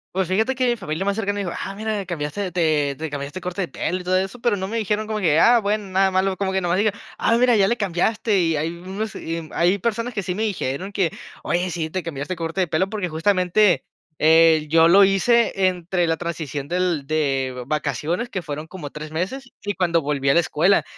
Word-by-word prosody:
Pues 190 -1 +1
fíjate 220 +8 +1
que 255 -1 +1
mi 240 - +2
familia 175 -4 -3
más 200 0 +1
cercana 205 -2 -1
me 205 - -2
dijo: 180 -3 -3
"Ah, 195 - -5
mira, 215 -1 -3
cambiaste, 175 +3 -3
te 155 -5 +1
te 160 0 -4
cambiaste 145 +3 -5
el - - -16
corte 180 +2 -3
de - - -4
pelo 180 +3 -3
y - - -8
todo 185 +1 +1
eso", 190 +5 -3
pero 235 -2 +1
no 190 -1 -3
me 225 +3 -3
dijeron 215 0 -1
como 215 0 -3
que, 160 -6 +3
ah, 240 +5 +6
bueno, 210 0 -1
nada 190 +1 +2
malo, 190 0 +1
como 195 -1 -1
que 190 0 0
nada 175 -1 -1
más - - +2
dijeron: 205 0 0 0.2
"Ah, 230 - +2
mira, 245 0 +4
ya 195 -2 +4
le 235 - 0
cambiaste", 205 +2 +1
y 165 -2 +1
hay 155 +2 -1
unos, 190 +4 -5
y 165 -1 -5
hay 175 +4 +2
personas 230 +4 -2
que 200 - -3
sí 180 - -2
me 210 +4 -2
dijeron 190 -3 -3
que: 190 -5 0 0.3
"Oye, 175 +2 0
sí 165 -2 -3
te 185 +2 -3
cambiaste 145 +1 -4
de - - -6
corte 165 +3 -2
de 180 - +1
pelo", 165 +5 0
porque 205 -4 -3
justamente, 180 +3 +2 0.4
eh, 160 0 +5
yo 165 +1 +6
lo 195 +4 +7
hice 195 +5 +3 0.2
entre 180 -1 -1
la 165 0 +1
transición 155 -5 -4
del 175 -5 0
de 135 -4 -1
vacaciones, 155 - -2
que 190 - -3
fueron 150 -2 -6
como 165 -3 -8
3 150 0 -8
meses, 240 +11 -4
y 205 - -1
cuando 170 -3 +1
volví 140 -2 -1
a - - +5
la 170 - +5
escuela. 170 +3 +2
180 Hz, 240 wpm, -22 LUFS, 160-205 Hz, 0.4 s, lo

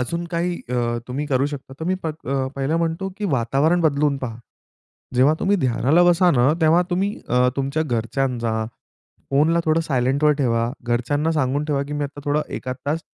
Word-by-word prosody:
अजून 170 +8 -2
काही 175 +1 -1
अ, 120 -1 -1
तुम्ही 140 +4 -3
करू 135 -1 +1
शकता 140 -2 -7
तर 160 - -3
अ, - - -4
मी 185 - +2 0.6
पहिलं 140 +4 0
म्हणतो 165 +3 -1
की 210 - -3
वातावरण 135 +7 +2
बदलून 145 -2 +2
पहा. 115 -4 -5 0.8
जेव्हा 135 +5 +5
तुम्ही 200 +1 +2
ध्यानाला 135 +4 +3
बसा 175 0 +4
ना 125 +2 +3
तेव्हा 160 +3 +5
तुम्ही 195 +3 0
अ, 125 +1 +3
तुमच्या 140 +3 -1
घरच्यांचा 115 -2 -1 0.6
फोनला 155 +5 +3
थोडं 160 +1 +3
सायलेंटवर 140 +1 +2
ठेवा, 115 -3 +1
घरच्यांना 125 +7 0
सांगून 145 -1 0
ठेवा 140 -2 0
की 150 - -5
मी 145 - -1
आता 145 0 -6
थोडं 145 +1 +1 0.2
एखाद 130 0 -5
तास 155 +3 0
145 Hz, 175 wpm, -22 LUFS, 125-160 Hz, 0.8 s, जेव्हा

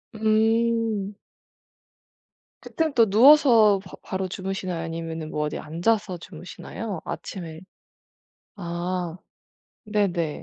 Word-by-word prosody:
음. 220 -1 +1 1.4
그땐 320 -2 -2
또 230 -3 +5
누워서 230 -3 +6
바 190 -1 -14
바로 190 0 -3
주무시나요 185 -2 -4
아니면은 165 -1 -5
뭐 150 -1 -2
어디 150 - -3
앉아서 180 +5 -1
주무시나요. 180 +3 -7
아침에 165 -5 -6 1.0
아. 175 -1 -3 0.7
네네. 190 -7 -1
190 Hz, 205 characters per minute, -25 LUFS, 170-220 Hz, 1.4 s, 누워서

